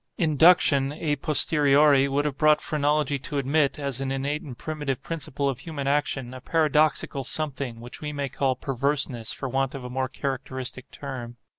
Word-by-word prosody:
Induction, 155 Hz, -4 st, +4 dB
a 150 Hz, -1 st, -1 dB
posteriori, 145 Hz, -1 st, +4 dB
would 140 Hz, +2 st, 0 dB
have 145 Hz, -3 st, -1 dB
brought 155 Hz, +1 st, +4 dB
phrenology 150 Hz, -1 st, 0 dB
to 150 Hz, +1 st, -4 dB
admit, 140 Hz, +2 st, +1 dB
as 140 Hz, -3 st, -3 dB
an 135 Hz, -1 st, -2 dB
innate 140 Hz, +3 st, -2 dB
and 125 Hz, -5 st, -9 dB
primitive 145 Hz, -4 st, -4 dB
principle 145 Hz, -4 st, -3 dB
of 135 Hz, -3 st, -2 dB
human 145 Hz, -2 st, -5 dB
action, 135 Hz, -3 st, -1 dB
a 130 Hz, -, -9 dB
paradoxical 155 Hz, -2 st, +1 dB
something, 135 Hz, -4 st, -3 dB
which 120 Hz, +1 st, -10 dB
we 150 Hz, -1 st, -4 dB
may 140 Hz, -1 st, -3 dB
call 135 Hz, 0 st, 0 dB
perverseness, 135 Hz, -2 st, -1 dB
for 135 Hz, -, -5 dB
want 135 Hz, +1 st, -1 dB
of 135 Hz, -, -7 dB
a 125 Hz, -, -7 dB
more 130 Hz, 0 st, -1 dB
characteristic 130 Hz, -1 st, -5 dB
term. 125 Hz, -4 st, -7 dB
140 Hz, 170 wpm, -25 LUFS, 130-150 Hz, -, Induction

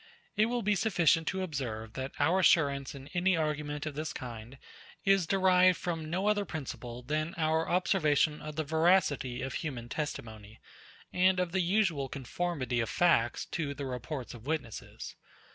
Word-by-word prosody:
It 215 Hz, +1 st, +3 dB
will 240 Hz, 0 st, -1 dB
be 210 Hz, +1 st, +3 dB
sufficient 175 Hz, -6 st, +2 dB
to 190 Hz, 0 st, -1 dB
observe 115 Hz, -9 st, -4 dB
that 130 Hz, 0 st, -5 dB
our 180 Hz, +3 st, +3 dB
assurance 140 Hz, -7 st, +3 dB
in 135 Hz, 0 st, -10 dB
any 180 Hz, 0 st, +2 dB
argument 150 Hz, -1 st, -2 dB
of 155 Hz, -, -4 dB
this 155 Hz, +1 st, -4 dB
kind 120 Hz, 0 st, -8 dB, 0.5 s
is 195 Hz, -4 st, +4 dB
derived 185 Hz, -1 st, +4 dB
from 165 Hz, -3 st, -4 dB
no 185 Hz, +4 st, -1 dB
other 210 Hz, -1 st, +2 dB
principle 125 Hz, -8 st, -6 dB
than 155 Hz, +5 st, -2 dB
our 160 Hz, 0 st, +1 dB
observation 155 Hz, -4 st, +2 dB
of 155 Hz, 0 st, -7 dB
the 155 Hz, -, -1 dB
veracity 155 Hz, -5 st, +2 dB
of 130 Hz, -, -4 dB
human 125 Hz, -7 st, -4 dB
testimony, 110 Hz, -8 st, -6 dB, 0.5 s
and 185 Hz, 0 st, +3 dB
of 180 Hz, -2 st, 0 dB
the 190 Hz, +1 st, +1 dB
usual 170 Hz, -7 st, +1 dB
conformity 135 Hz, -2 st, -2 dB
of 115 Hz, -, -1 dB
facts 145 Hz, -10 st, +2 dB
to 145 Hz, -4 st, -2 dB
the 140 Hz, -, -5 dB
reports 130 Hz, +1 st, -5 dB
of 120 Hz, +2 st, -12 dB
witnesses. 150 Hz, -8 st, -5 dB
155 Hz, 160 wpm, -31 LUFS, 135-180 Hz, 0.5 s, is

